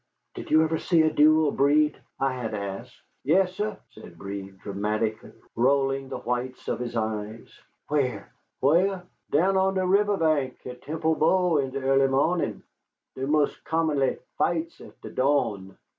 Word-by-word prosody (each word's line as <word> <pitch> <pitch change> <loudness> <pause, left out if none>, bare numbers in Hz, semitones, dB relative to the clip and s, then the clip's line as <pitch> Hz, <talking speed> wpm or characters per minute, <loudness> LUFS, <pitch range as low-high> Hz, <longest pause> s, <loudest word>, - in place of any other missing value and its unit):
"Did - - -8
you 155 +1 +5
ever 160 0 -1
see 165 -3 +3
a 155 -1 +1
duel, 155 0 +5
Breed?" 145 +1 +2 0.2
I 135 -1 +1
had 115 -4 -4
asked. 100 -1 -6 0.2
"Yessah," 190 +6 +1
said 110 -7 -14
Breed, 100 +1 -7
dramatically, 105 +3 -3 0.2
rolling 135 +2 +1
the - - -4
whites 125 +1 -4
of - - -2
his 120 -1 -5
eyes. 110 0 -3 0.4
"Where?" 140 -4 -1 0.3
"Whah? 180 +7 +3 0.3
Down 190 +6 +2
on 190 0 +2
de 185 -1 +1
riveh 200 +2 +2
bank 155 -6 0
at 125 0 -8
Temple 160 +1 -1
Bow 175 0 +3
in 135 -1 -1
de 135 +1 -4
ea'ly 135 0 +3
mo'nin'! 150 +6 0 0.5
Dey 130 - -3
mos' 150 0 +2
commonly 155 -5 0 0.2
fights 170 -1 -1
at - - -14
de - - -9
dawn." 110 -9 0
140 Hz, 155 wpm, -26 LUFS, 120-160 Hz, 0.5 s, you